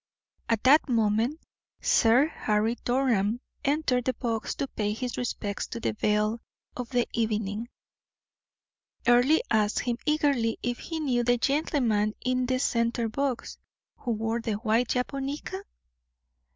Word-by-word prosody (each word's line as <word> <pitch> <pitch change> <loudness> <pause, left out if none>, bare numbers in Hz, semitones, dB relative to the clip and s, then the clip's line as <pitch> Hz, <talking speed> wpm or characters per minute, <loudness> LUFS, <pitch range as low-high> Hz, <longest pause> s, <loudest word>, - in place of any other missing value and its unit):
At 225 -2 +1
that 285 +3 +5
moment 230 +5 +1 0.4
Sir 240 +5 +4
Harry 220 -6 0
Durham 240 -4 +1 0.2
entered 275 -4 +1
the 255 - 0
box 230 -3 -2
to 275 - -2
pay 210 -4 -2
his 245 +2 -4
respects 210 -4 -3
to 235 - -6
the - - -1
belle 210 +1 +1 0.4
of 250 -2 -5
the 245 -2 +1
evening. 220 0 -1 1.4
Earle 245 +6 +5
asked 210 -1 +2
him 240 -2 -1
eagerly 280 -7 +2
if 245 0 -2
he 325 -1 -5
knew 255 -6 +1
the 245 +1 +3
gentleman 240 -6 +1
in 255 0 +1
the 255 0 +1
center 235 -2 0
box, 275 +1 -3 0.4
who 245 - -6
wore 225 +2 -1
the 225 -1 -2
white 225 +3 +1
japonica? 275 +9 -3
240 Hz, 135 wpm, -27 LUFS, 220-260 Hz, 1.4 s, that